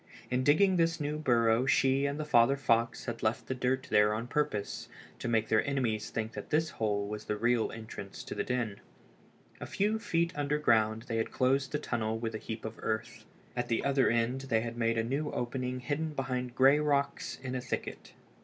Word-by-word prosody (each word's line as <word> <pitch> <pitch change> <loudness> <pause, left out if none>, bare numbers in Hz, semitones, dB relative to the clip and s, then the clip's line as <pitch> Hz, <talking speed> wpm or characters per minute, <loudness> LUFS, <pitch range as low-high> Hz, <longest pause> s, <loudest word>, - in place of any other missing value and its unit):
In 125 +1 +1
digging 185 +7 +4
this 165 -1 +2
new 150 +1 -2
burrow 120 -3 +3
she 140 -1 +3
and 140 +2 -3
the 155 - -2
father 135 -1 +4
fox 115 -3 +1
had 115 -2 -4
left 110 +2 0
the - - -2
dirt 130 +1 0
there 105 0 +4
on 115 +2 -3
purpose, 120 -6 -2 0.3
to - - -4
make 110 -2 +1
their 110 - +3
enemies 120 -6 -1
think 110 0 -3
that 105 -2 -8
this 155 +1 +1
hole 105 -2 -1
was 105 +1 -6
the 105 - -2
real 120 +1 +1
entrance 110 -3 -8
to - - -6
the - - -2
den. 120 -5 -2 0.8
A - - -6
few 210 +3 0
feet 170 -6 0
underground 115 -7 +2
they 115 -2 -3
had 115 - 0
closed 135 +1 +1
the 150 - 0
tunnel 110 -6 -2
with 115 0 -3
a 110 - -4
heap 110 0 -6
of 110 0 -6
earth. 110 0 -3 0.3
At 120 0 -1
the 115 - 0
other 140 -1 +3
end 120 +3 +1
they 110 -3 +3
had 115 0 -5
made 115 -1 +1
a 115 - +2
new 140 +6 -1
opening 125 +1 -3
hidden 150 +4 -2
behind 125 -2 -3
gray 135 +3 +6
rocks 145 -2 0
in 130 -1 -4
a 130 - -2
thicket. - - -5
125 Hz, 205 wpm, -31 LUFS, 115-140 Hz, 0.8 s, gray